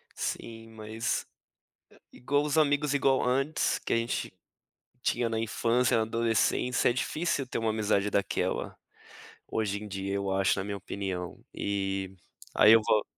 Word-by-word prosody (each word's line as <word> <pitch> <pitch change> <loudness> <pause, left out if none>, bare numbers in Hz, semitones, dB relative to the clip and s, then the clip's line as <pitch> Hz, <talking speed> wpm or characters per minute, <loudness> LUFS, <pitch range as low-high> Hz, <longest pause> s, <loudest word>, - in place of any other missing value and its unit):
Sim, 115 -1 -5
mas, 110 +1 -3 0.9
igual 145 +3 0
os 150 +1 -1
amigos 145 -1 +3
igual 135 -1 +3
antes 135 +5 +1
que - - -2
a - - +3
gente 115 -4 -2 0.7
tinha 120 -1 0
na 115 -1 -1
infância, 115 +2 +1
na 110 - +2
adolescência, 115 +2 +1
é - - +1
difícil 155 +3 -1
ter 125 - -4
uma 115 -1 0
amizade 105 -2 +1
daquela 100 -1 -1 0.7
hoje 100 -2 -2
em 105 - -7
dia. 100 0 -3
Eu 100 -1 -1
acho 95 +1 +2
na 95 - -2
minha 100 0 -4
opinião, 95 -2 -5
e 95 -1 -2 0.4
ai 110 +2 +8
eu 115 - +7
vou 105 - +3
110 Hz, 150 wpm, -29 LUFS, 100-125 Hz, 0.9 s, ai